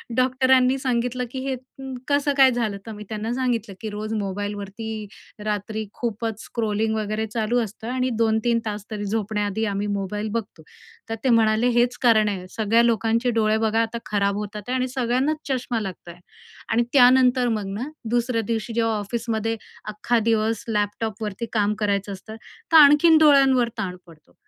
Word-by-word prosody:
डॉक्टरांनी 255 0 +3
सांगितलं 250 -1 -1
की 265 - -5
हे 265 - 0 0.5
कसं 285 0 +2
काय 265 -1 +7
झालं? 225 -4 -1
तर 225 - -7
मी 210 -1 -8
त्यांना 220 +2 -3
सांगितलं 240 -5 -2
की 220 - -4
रोज 215 +1 -5
मोबाईलवरती 205 +1 -4 0.4
रात्री 215 +1 -3
खूपच 225 -2 -4
स्क्रोलिंग 220 -1 -1
वगैरे 215 +1 -2
चालू 225 +2 0
असतं 220 +1 -8
आणि 255 0 0
2-3 230 +1 +2
तास 210 -1 -4
तरी 205 -1 -4
झोपण्याआधी 210 0 -1
आम्ही 205 0 -2
मोबाईल 205 +1 -3
बघतो, 210 -8 -5 0.5
तर 225 - -2
ते 260 - +2
म्हणाले 225 0 +3
हेच 245 +1 +2
कारण 220 -3 +5
आहे 185 -2 -5
सगळ्या 225 +3 +2
लोकांचे 230 +1 +1
डोळे 215 0 +2
बघा 225 0 +1
आता 230 +1 -2
खराब 200 -1 0
होतात 210 0 -5
आहे, 255 - -1
आणि 255 0 0
सगळ्यांनाच 255 +4 0
चष्मा 250 -3 -1
लागतय. 180 -3 -8 0.5
आणि 230 +2 +2
त्यानंतर 255 -1 +5
मग 215 -3 -2
ना 265 - -4 0.2
दुसऱ्या 240 -1 +1
दिवशी 225 +1 -3
जेव्हा 225 -1 +1
ऑफिसमध्ये 225 +1 -2 0.3
अख्खा 215 +3 0
दिवस 220 -1 +1
लॅपटॉपवरती 210 0 -2
काम 210 -1 +2
करायचं 200 -1 0
असतं, 215 +3 -10 0.4
तर 325 - +8
आणखीन 300 +2 +7
डोळ्यांवर 270 -5 +5
ताण 180 -1 -3
पडतो. 160 -2 -19
225 Hz, 160 wpm, -23 LUFS, 210-245 Hz, 0.5 s, तर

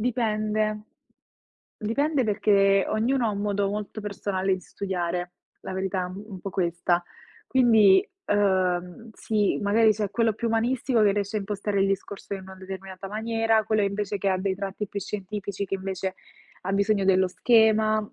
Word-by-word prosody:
Dipende, 215 -2 0 0.9
dipende 280 +6 0
perché 200 -2 +3
ognuno 240 +3 +1
ha - - +1
un 200 -1 -3
modo 205 -1 0
molto 210 +1 -4
personale 195 -2 -1
di 185 - -7
studiare, 180 -2 -3 0.3
la - - -6
verità 190 0 -2
è - - -2
un 190 +1 -8
po' 195 - -5
questa. 175 -1 0 0.5
Quindi, 220 -7 +5 0.2
uhm, 185 0 0
sì, 210 -2 0
magari 215 +2 +4
c'è 210 -1 -2
quello 225 0 +1
più 235 +2 -3
umanistico, 235 +1 +1
che 205 - +5
riesce 200 +1 -2
a - - 0
impostare 200 0 -2
il 195 - +3
discorso 195 +1 -4
in 195 - -7
una 190 0 -11
determinata 190 0 -8
maniera, 225 +1 +1
quello 215 -1 +1
invece 200 0 -1
che 195 - 0
ha 190 -1 +1
dei 190 0 -1
tratti 195 +2 -4
più 200 +1 -5
scientifici, 200 0 -4
che 195 - -3
invece 190 0 -3 0.5
ha 195 - -3
bisogno 200 0 +2
dello 190 0 +4
schema. 220 +1 +4
200 Hz, 160 wpm, -26 LUFS, 190-215 Hz, 0.9 s, Quindi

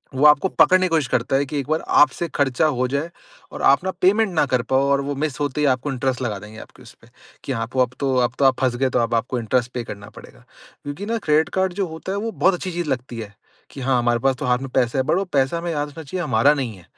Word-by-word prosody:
वो 135 +3 +2
आपको 150 +4 +6
पकड़ने 185 0 +4
की - - -1
कोशिश 160 -5 +1
करता 125 +3 0
है 140 +1 +2
कि 145 +1 -3
एक 135 - -5
बार 155 +1 +1
आपसे 150 +3 +3
खर्चा 140 +1 +1
हो 130 - +1
जाए 140 +5 -2 0.4
और - - -7
आप - - +3
ना 190 - -1
पेमेंट 205 +4 +3
ना 155 - +2
कर 130 -3 0
पाओ 135 +1 +3
और 140 0 +2
वो 140 +1 -3
मिस 150 -3 -3
होते 145 0 -2
ही - - +2
आपको 130 +2 0
इंटरेस्ट 130 -1 -2
लगा 110 -5 -2
देंगे 105 +2 -11
आपके - - -14
उसपे - - -17 0.4
कि - - -5
हाँ 115 -3 -2
आप 120 +4 -8
अब 125 -1 0
तो 135 -2 0
अब 120 - -4
तो 140 - +3
आप 130 -1 +3
फँस 130 -2 +1
गए 130 +1 0
तो 125 - 0
अब 115 0 0
आपको 120 +2 -1
इंटरेस्ट 120 +2 -1
पे 125 - -3
करना 105 -2 -9
पड़ेगा। - - -15 0.4
क्योंकि 145 +8 -6
ना 230 +2 -1
क्रेडिट 155 -6 +1
कार्ड 190 -1 +1
जो 195 0 -2
होता 160 +3 -7
है 200 - -2
वो 225 +2 -3
बहुत 190 -2 +2
अच्छी 185 +1 -4
चीज़ 175 -2 -3
लगती 125 -2 -3
है। 105 -2 -8 0.4
कि 135 - -9
हाँ, 130 0 +1
हमारे 120 0 +1
पास 135 +2 +1
तो - - -4
हाथ 125 0 +2
में 135 0 -6
पैसे 125 -1 +1
हैं 130 - +1
बट - - +3
वो 195 - 0
पैसा 135 +3 +1
हमें 170 0 -3
याद 150 -2 -2
रखना 160 +2 -10
चाहिए 175 +5 -4
हमारा 140 0 +3
नहीं 130 -7 -3
है। 90 - -17
135 Hz, 285 wpm, -21 LUFS, 125-160 Hz, 0.4 s, आपको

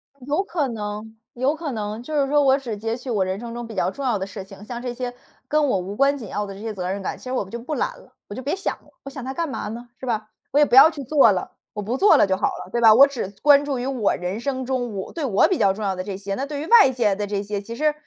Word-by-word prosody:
嗯， 265 -3 -15
有 300 +7 +1
可 335 -7 -1
能 215 0 -6 0.2
有 260 +5 0
可 310 -3 -4
能， 215 -1 -4
就 305 +5 -6
是 275 - +1
说， 295 +1 +4
我 270 -1 +5
只 240 -6 -5
截 225 +2 -2
取 250 +1 -9
我 210 -5 +1
人 190 +1 -3
生 235 0 -7
中 240 0 -6
比 225 - -9
较 190 - +1
重 275 - -7
要 240 -5 +2
的 190 - -3
事 195 0 -8
情， 195 +1 -13
像 240 +1 -6
这 245 -1 -4
些 245 0 -4 0.3
跟 300 -1 +2
我 250 - +2
无 190 +3 -6
关 275 +4 +3
紧 235 -6 -8
要 210 - -2
的 195 - -7
这 195 - -11
些 220 0 -4
责 180 -2 -4
任 200 +1 -3
感， 190 - -4
其 - - -18
实 255 - -5
我 250 -7 -1
就 235 - -6
不 265 +6 -4
揽 - - -2
了， - - -20
我 - - -8
就 255 - -5
别 280 +6 -1
想 390 - -2
了， - - -24
我 275 - -7
想 270 -2 -8
它 265 +2 -4
干 335 +4 -2
嘛 265 - -4
呢， 235 +3 -7
是 - - -7
吧？ 220 -3 -2 0.2
我 285 - +3
也 295 - +7
不 245 - -7
要 270 +4 +10
去 295 -3 -7
做 270 -4 +5
了， 185 -2 -2 0.2
我 210 - -4
不 225 +5 -2
做 405 +8 +6
了 - - +5
就 190 -1 +1
好 - - +1
了， - - -6
对 240 - -1
吧？ 225 -2 +8
我 265 +5 +9
只 275 -8 -4
关 285 0 +7
注 285 -2 -2
于 245 - -3
我 255 -6 0
人 180 +4 -4
生 260 0 -3
中 245 -4 -2
我 190 - -6
对 320 -4 -3
我 210 -6 +4
比 375 - 0
较 195 - +4
重 215 +2 -6
要 195 -2 0
的 185 - -4
这 195 -1 -5
些， 200 0 -5
那 270 - -2
对 285 0 -5
于 - - -4
外 460 - +7
界 225 -6 +1
的 205 +1 -3
这 200 0 -2
些， 205 0 -3
其 230 +3 -8
实 305 +3 +1
240 Hz, 350 characters per minute, -23 LUFS, 205-275 Hz, 0.3 s, 要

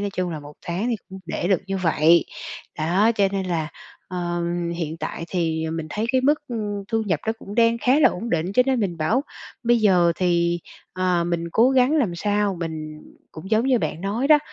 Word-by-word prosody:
nói 205 0 -2
chung 180 -1 -1
là 155 -2 -5
một 145 0 -12
tháng 185 +8 -1
thì 235 - 0
cũng 190 0 -9
để 175 - -2
được 190 -4 +3
như 195 0 -2
vậy. 165 -1 +4 0.5
Đó, 185 +8 +3
cho 200 -2 +3
nên 190 -1 -2
là, 160 -3 -1 0.4
ờ, 175 -1 -2 0.3
hiện 160 -1 -3
tại 165 - -5
thì 160 -3 -1
mình 160 -1 -4
thấy 215 +6 -2
cái 260 - +3
mức, 290 +3 +4
ưm, 205 -4 -3
thu 225 -1 0
nhập 165 -6 0
nó 220 - +2
cũng 200 - -9
đang 230 0 +3
khá 255 +5 +3
là - - +7
ổn 225 +6 -5
định, 170 +3 0
cho 250 - +5
nên 260 -3 +2
mình 180 -5 -1
bảo 210 - +1 0.4
bây 240 0 +3
giờ 180 -5 +4
thì, 170 -1 +1 0.3
ờ, 180 -2 +1
mình 170 -1 -1
cố 240 +4 +5
gắng 260 +2 +4
làm 215 - +1
sao 205 +1 0
mình 155 -2 -5 0.3
cũng 170 +5 -9
giống 220 +3 +3
như 260 -2 +3
bạn 155 -2 -3
nói 215 +8 -1
đó, 305 -1 +8
185 Hz, 220 wpm, -23 LUFS, 170-225 Hz, 0.5 s, đó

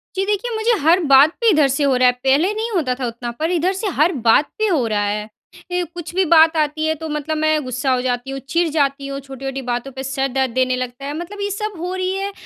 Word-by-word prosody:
जी 385 - 0
देखिए 420 +4 -1
मुझे 440 +1 +1
हर 335 +4 +5
बात 275 +2 +6
पे 465 - +4
इधर 305 -7 +4
से 275 +3 -1
हो 275 -2 +3
रहा 250 0 +4
है। - - +6
पहले 295 +10 +3
नहीं 445 +2 -3
होता 275 -8 +1
था 255 - -2
उतना 235 +1 -5
पर 325 +3 0
इधर 360 +2 +1
से 400 +2 -3
हर 310 +5 +4 0.2
बात 255 +6 +5
पे 435 0 +1
हो 310 - +1
रहा 205 -1 0
है। 210 +1 -2 0.4
ए 360 0 0
कुछ 345 -1 -8
भी 380 - +3
बात 320 0 +6
आती 305 +1 0
है 315 - +2
तो 320 +1 -7
मतलब 300 +1 -3
मैं 310 -1 +1
गुस्सा 255 +1 -2
हो 250 - 0
जाती 250 +1 -2
हूँ, 270 - -4
चिड़ 335 +6 0
जाती 280 -2 0
हूँ, 275 0 -5
छोटी-छोटी 270 0 -6
बातों 245 +3 -3
पे 265 0 -7
सिर 270 0 -1
दर्द 265 -2 0
देने 255 0 +1
लगता 255 +1 -5
है। 285 - -4
मतलब 400 +4 -7
ये 405 - -1
सब 420 0 -4
हो 360 +2 -3
रही 370 0 -1
है 395 +1 -3
295 Hz, 265 wpm, -19 LUFS, 265-355 Hz, 0.4 s, बात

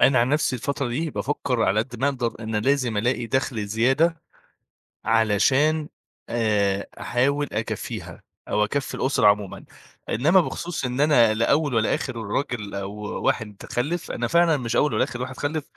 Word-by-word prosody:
أنا 130 -1 +5
عن 120 +2 +3
نَفْسي 145 -3 +1
الفترة 140 +1 -2
دي 155 +7 -2
بافكّر 130 -4 -1
على 100 +2 +3
قد 120 +2 -6
ما 140 - +3
أقدر 125 -5 -2
إن 110 -1 -3
لازم 125 0 +1
ألاقي 120 +2 0
دَخْل 115 -3 -1
زيادة 135 +10 +2 0.8
علشان 130 +8 +3 0.4
آآ 105 -4 +1
أحاول 140 +7 +1
أكفّيها 110 +1 -5 0.3
أو 105 - +2
أكفّي 135 +6 -3
الأسرة 130 -5 +2
عمومًا. 105 -2 +1 0.4
إنّما 160 - +4
بخصوص 170 -3 -4
إن 125 +2 -1
أنا 120 -7 +5
لا 115 +2 +1
أول 145 -1 +2
ولا 110 -1 +2
آخِر 130 - -4
راجل 110 -1 -3
أو 100 0 -4 0.3
واحد 105 -3 0 0.2
خلِّف، 150 +8 -2
أنا 120 - -2
فعلًا 170 +2 +4
مش 120 -3 -3
أول 150 - +2
ولا - - +2
آخِر 125 - -4
واحد 130 0 -5
خَلِّف، 150 +1 -2
125 Hz, 165 wpm, -24 LUFS, 110-145 Hz, 0.8 s, أنا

